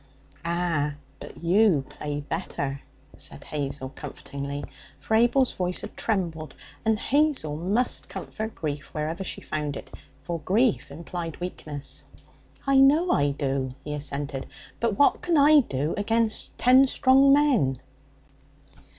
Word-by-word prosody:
'Ah, 170 -4 0 0.2
but - - -11
you 175 -5 +4
play 145 -1 -5
better,' 140 -1 -4 0.3
said - - -10
Hazel 140 -2 -4
comfortingly; 140 0 -6 0.4
for - - -4
Abel's 240 +3 +4
voice 180 0 -2
had 210 - -8
trembled, 165 - -2 0.3
and 220 -1 +2
Hazel 280 - +1
must 200 +10 -1
comfort 220 0 -6
grief 145 -2 -4
wherever 160 +5 -2
she - - -5
found 150 -2 -3
it, - - -10 0.3
for 170 -1 -3
grief 210 - +1
implied 165 +2 -6
weakness. 150 -5 -6 0.6
'I 275 -1 +4
know 300 +7 +5
I 145 0 +3
do,' 135 -2 -2
he 150 - -4
assented; 140 -1 -4 0.3
'but 230 -3 0
what 285 - +4
can 345 -3 +1
I 295 +1 +7
do 145 - -1
agen 225 +2 +1 0.3
ten 260 +2 +6
strong 270 +1 +5
men?' 255 - +3
170 Hz, 130 wpm, -26 LUFS, 145-230 Hz, 0.6 s, I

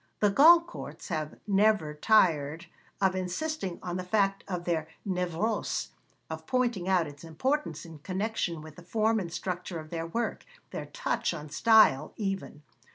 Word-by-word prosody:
The 205 -1 +4
Goncourts 335 +5 +4
have 155 -3 -3
never 205 -6 +3
tired 160 -3 +3 0.3
of 190 -1 +2
insisting 185 - -3
on 175 0 -3
the 185 - -3
fact 195 +1 +1
of 180 -3 -3
their 160 -3 0 0.2
névrose, 180 +4 -1 0.4
of - - -7
pointing 240 -8 0
out 180 -3 +3
its 145 0 -11
importance 165 - -2
in 165 -2 -11
connection 185 -2 -2
with 155 -1 -12
the - - -10
form 220 +4 +1
and 175 -4 -5
structure 180 -1 -4
of 155 0 -11
their 165 -1 -3
work, 230 +7 -2 0.3
their - - -5
touch - - -1
on 150 -1 -8
style, 215 -11 +5
even. 195 -7 -4
185 Hz, 155 wpm, -29 LUFS, 165-220 Hz, 0.4 s, style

